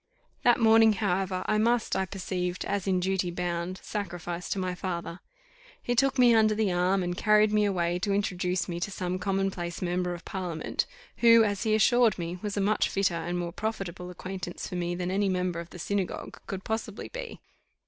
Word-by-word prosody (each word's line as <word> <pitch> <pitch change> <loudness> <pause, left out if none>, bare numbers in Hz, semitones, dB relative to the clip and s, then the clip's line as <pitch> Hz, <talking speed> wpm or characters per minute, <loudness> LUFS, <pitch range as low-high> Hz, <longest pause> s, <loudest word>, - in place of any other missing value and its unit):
That 240 0 +4
morning, 225 -1 +6
however, 190 -2 -1
I 215 - +1
must, 235 +1 +2
I 190 - 0
perceived, 180 -2 -3
as 200 -1 -2
in 185 -1 +2
duty 190 0 0
bound, 175 +1 -3
sacrifice 175 -3 -4
to - - -1
my 185 -1 -1
father; 175 -1 -4 0.6
he 245 - -1
took 270 +2 +2
me 245 -2 +6
under 215 -1 +4
the 210 -3 +1
arm, 180 +2 +2
and 175 0 -2
carried 210 +2 +4
me 210 0 +4
away 175 -3 0
to 200 +2 -1
introduce 180 -3 0
me 170 -1 -4
to 190 - -2
some 185 -1 -3
commonplace 190 -2 -2
member 180 0 -1
of 175 - -12
parliament, 180 -4 -3 0.3
who, 230 -1 +7
as 205 -2 -1
he 220 -2 +2
assured 235 0 +4
me, 175 0 -4
was 205 -1 -3
a - - +2
much 210 +2 +2
fitter 195 -2 +1
and 175 +1 -2
more 170 -1 -3
profitable 190 -4 -4
acquaintance 180 0 -6
for - - -9
me 175 0 -1
than 180 0 -2
any 200 +1 +1
member 180 -2 -1
of 170 0 -7
the - - -10
synagogue 195 +2 -3
could 195 -1 -5
possibly 220 -1 -4
be. - - -7
190 Hz, 195 wpm, -28 LUFS, 175-210 Hz, 0.6 s, who